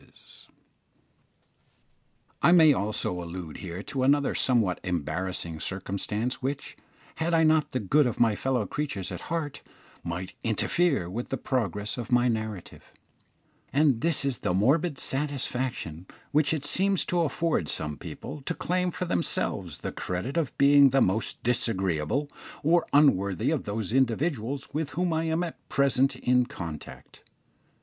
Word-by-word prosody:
I - - +6
may 160 -4 +7
also 100 -5 -2
allude 85 -2 -7
here 90 +1 -6
to 135 +1 -3
another 140 +2 +3
somewhat 115 -8 +2
embarrassing 85 0 -3
circumstance 100 +6 -3
which, 135 +2 -4 0.4
had 165 +1 +1
I 160 - +4
not 155 -1 +3
the 130 - -1
good 135 +7 +3
of 120 - -3
my 115 -3 +4
fellow 125 -1 0
creatures 100 -6 -3
at - - -7
heart, 160 -4 -3 0.4
might 90 +2 -4
interfere 130 - +1
with 115 +7 -5
the 135 - -1
progress 110 -4 -2
of 120 -1 -6
my 120 0 +4
narrative; 110 -5 -4 0.9
and 140 -4 +3
this 165 -4 +1
is 135 -4 -1
the 90 - 0
morbid 145 - +2
satisfaction 130 - -3 0.2
which 150 -1 +3
it 155 -3 -1
seems 195 +4 +1
to 175 -1 +1
afford 155 - 0
some 75 -1 -2
people 140 - -8
to - - -1
claim 180 +1 0
for 180 - -3
themselves 90 - -1
the - - -3
credit 90 - -4
of 165 -5 -1
being 140 0 +7
the 135 +1 +3
most 100 +4 0
disagreeable 95 - 0 0.4
or 165 +3 +3
unworthy 100 - +3
of - - -1
those 105 +1 -3
individuals 135 +1 0
with 155 0 -1
whom 180 -2 +1
I 160 +1 0
am 160 +2 0
at 170 - -8
present 135 -1 +2
in 125 0 +2
contact. 85 - -8
125 Hz, 145 wpm, -27 LUFS, 95-150 Hz, 0.9 s, may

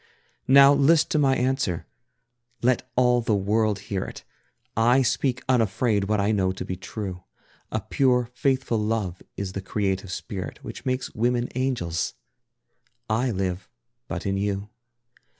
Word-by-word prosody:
Now 140 +1 +8
list 145 +3 +4
to 155 - +2
my 135 -2 +4
answer; 125 - 0 0.8
let 125 0 +1
all 125 -1 +4
the 110 -2 +1
world 105 +1 +1
hear 100 -1 -3
it, - - -9 0.5
I 120 +4 +4
speak 125 0 0
unafraid 115 -3 +2
what 105 +1 +1
I 100 +2 +2
know 95 -3 +2
to - - -6
be 95 - -3
true: 95 -1 -6 0.5
A - - -1
pure, 125 -3 +1
faithful 130 -2 0
love 105 -4 -2 0.2
is 95 -2 -4
the 100 - -4
creative 95 -1 -2
spirit 95 -1 -6
Which - - -8
makes 130 0 -2
women 120 +2 0
angels! 120 -11 -1 1.0
I 120 +4 +2
live 95 -3 -2 0.4
but - - -5
in 100 0 0
you. 100 0 -2
110 Hz, 145 wpm, -25 LUFS, 100-125 Hz, 1.0 s, Now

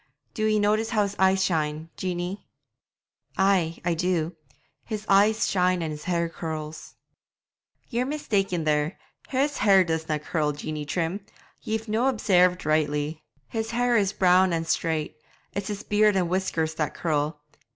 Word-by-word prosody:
Do 215 -1 0
ye 215 0 +3
notice 215 +2 +2
how 215 -3 +2
his 200 0 -3
eyes 190 0 +4
shine, 155 -1 -1
Jeanie?' 180 +1 -4 0.9
'Ay, 185 -4 +2 0.2
do 170 -1 -1
I; 155 -4 -34 0.3
his 215 -2 -5
eyes 210 +3 +4
shine 180 -2 +1
and 160 - -3
his 150 0 -8
hair 170 -1 0
curls.' 155 -2 -6 1.0
'Ye're 245 +1 0
mistaken 195 - -1
there, 150 +3 0 0.3
his 280 +2 0
hair 195 -3 +5
doesna 160 -2 -1
curl, 150 0 -1
Jeanie 150 +1 -5
Trim 175 +5 -2 0.4
ye've 220 +1 -3
no' 225 +4 +1
obsairved 180 - +3
rightly; 150 0 0 0.3
his 225 -1 -3
hair 245 +1 +1
is 200 -3 +3
brown 185 -1 +4
and 165 0 -1
straight; 160 -7 -1 0.4
it's 200 -1 -3
his 210 0 -4
beard 210 0 +3
and 180 -3 +1
whiskers 170 -4 -1
that 155 -1 -2
curl. 150 -2 -1
180 Hz, 150 wpm, -26 LUFS, 160-210 Hz, 1.0 s, hair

